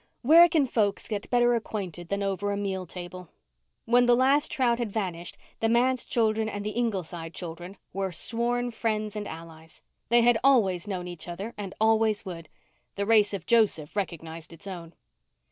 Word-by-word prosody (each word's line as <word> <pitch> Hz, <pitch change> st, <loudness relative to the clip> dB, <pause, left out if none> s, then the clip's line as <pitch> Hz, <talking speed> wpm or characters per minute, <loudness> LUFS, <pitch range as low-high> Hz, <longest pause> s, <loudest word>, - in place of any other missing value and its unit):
Where 335 Hz, +6 st, +8 dB
can 310 Hz, -4 st, +3 dB
folks 210 Hz, -5 st, 0 dB
get 210 Hz, -2 st, -4 dB
better 240 Hz, 0 st, +4 dB
acquainted 190 Hz, -7 st, -4 dB
than 200 Hz, 0 st, -1 dB
over 200 Hz, +1 st, -1 dB
a 200 Hz, -, -2 dB
meal 190 Hz, -2 st, -3 dB
table? 180 Hz, 0 st, -8 dB, 0.6 s
When 245 Hz, +1 st, +4 dB
the 240 Hz, -, +6 dB
last 275 Hz, +4 st, +3 dB
trout 240 Hz, -3 st, +1 dB
had 235 Hz, -4 st, -2 dB
vanished, 180 Hz, -5 st, -4 dB, 0.2 s
the 225 Hz, -, +1 dB
manse 250 Hz, +2 st, +2 dB
children 220 Hz, -1 st, +1 dB
and 205 Hz, -1 st, -5 dB
the 210 Hz, -, -2 dB
Ingleside 185 Hz, -8 st, -3 dB
children 175 Hz, +2 st, -7 dB, 0.2 s
were 195 Hz, -1 st, -2 dB
sworn 240 Hz, +7 st, -1 dB
friends 215 Hz, -2 st, -2 dB
and 210 Hz, -1 st, -4 dB
allies. 160 Hz, 0 st, -11 dB, 0.3 s
They 240 Hz, +1 st, +5 dB
had 235 Hz, -1 st, +4 dB
always 210 Hz, -10 st, +3 dB
known 185 Hz, -3 st, -4 dB
each 175 Hz, -1 st, -8 dB
other 195 Hz, +7 st, -6 dB
and 200 Hz, -2 st, -7 dB
always 220 Hz, -1 st, +2 dB
would. 165 Hz, -4 st, -8 dB, 0.5 s
The 200 Hz, -, -1 dB
race 215 Hz, -1 st, +4 dB
of 195 Hz, -4 st, -5 dB
Joseph 210 Hz, -10 st, +2 dB
recognized 165 Hz, -5 st, -5 dB
its 165 Hz, -, -12 dB
own. 175 Hz, -4 st, -8 dB
205 Hz, 175 wpm, -27 LUFS, 180-235 Hz, 0.6 s, Where